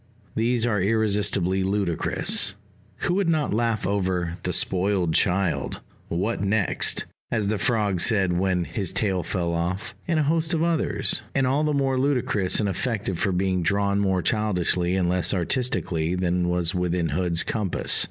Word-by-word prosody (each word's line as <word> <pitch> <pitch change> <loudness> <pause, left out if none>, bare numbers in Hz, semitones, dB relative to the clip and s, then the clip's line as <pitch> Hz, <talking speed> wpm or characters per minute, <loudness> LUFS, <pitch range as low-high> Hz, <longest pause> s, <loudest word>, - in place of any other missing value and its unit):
These 120 +1 +1
are 105 -5 +1
irresistibly 100 -3 +1
ludicrous 95 0 0 0.5
(who 175 - 0
would 190 -2 +1
not 155 -7 +1
laugh 115 -1 0
over 90 -3 -1
"The 90 - -2
Spoiled 90 -1 +1
Child" 95 -1 +1 0.3
"What 95 +7 -2
next? 100 -1 0 0.2
as 105 -4 0
the 105 -1 -1
Frog 105 -4 +1
said 95 -6 +2
when 90 0 +1
his 95 +1 -4
tail 95 -4 0
fell 85 -2 -2
off" 90 +4 -2
and 165 -2 +1
a - - +3
host 160 +3 +1
of 160 - 0
others?) 170 -2 +1
and 135 -1 +2
all 135 +4 +1
the 155 - +1
more 135 -2 +1
ludicrous 125 -9 +1
and 105 - +1
effective 100 -2 -2
for 100 - +1
being 95 0 0
drawn 100 +3 +1
more 95 -3 +1
childishly 90 -4 +1
and 95 -2 +1
less 90 +2 +2
artistically 90 - -1
than 90 -1 0
was 90 -1 +1
within 90 -2 0
Hood's 85 -2 0
compass. 105 -5 0
100 Hz, 160 wpm, -24 LUFS, 90-115 Hz, 0.5 s, a